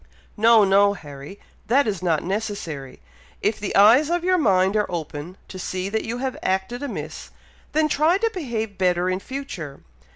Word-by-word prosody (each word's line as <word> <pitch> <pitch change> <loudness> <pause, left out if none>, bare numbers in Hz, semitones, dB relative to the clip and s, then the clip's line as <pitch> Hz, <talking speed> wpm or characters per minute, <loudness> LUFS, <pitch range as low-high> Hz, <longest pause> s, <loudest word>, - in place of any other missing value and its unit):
"No, 225 0 +6
no, 200 +1 +4
Harry! 145 +1 -10 0.3
that 275 +5 +4
is 200 -5 -2
not 165 -4 +1
necessary! 175 - -4 0.4
If 210 +1 +1
the 205 - -4
eyes 230 +10 +6
of 345 0 0
your 365 0 +3
mind 195 - +3
are 210 -1 +1
open, 165 +1 -5
to 185 - -9
see 185 +1 -3
that 220 +2 -2
you 230 +2 -3
have 260 0 -3
acted 190 +6 -1
amiss, 285 - -6 0.4
then 310 0 +3
try 310 +4 +3
to 455 +2 0
behave 225 - -4
better 180 0 +2
in 185 - -1
future. 195 - -7
205 Hz, 170 wpm, -23 LUFS, 185-250 Hz, 0.4 s, No